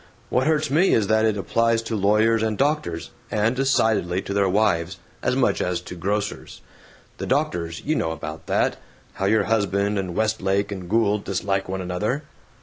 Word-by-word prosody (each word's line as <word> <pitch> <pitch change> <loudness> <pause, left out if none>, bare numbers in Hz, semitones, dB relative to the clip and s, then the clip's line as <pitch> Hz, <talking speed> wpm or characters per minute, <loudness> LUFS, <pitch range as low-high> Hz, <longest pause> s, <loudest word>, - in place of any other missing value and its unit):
What 130 +2 +2
hurts 155 -3 +1
me 170 +7 +4
is 110 - +2
that 110 0 +3
it 110 -2 +1
applies 115 +3 +1
to 115 - -3
lawyers 105 +3 +3
and 110 -1 0
doctors 135 - -1 0.2
(and 110 +3 +1
decidedly 110 -9 +2
to 100 - -4
their 100 -1 +2
wives!) 95 -3 +1 0.2
as 125 - +1
much 120 -7 +2
as 90 -1 -1
to 90 - -9
grocers. 100 +4 -3 0.6
The - - -4
doctors 85 -1 -1
you 155 - +1
know 80 - 0
about 80 -1 -7
that - - +1 0.4
how 95 - -3
your 110 +2 +3
husband 100 -2 +1
and 90 -3 -4
Westlake 100 -2 0
and 95 -3 -6
Gould 105 -1 +2
dislike 95 0 -1
one 95 0 -3
another." 105 +11 -2
105 Hz, 175 wpm, -23 LUFS, 95-115 Hz, 0.6 s, me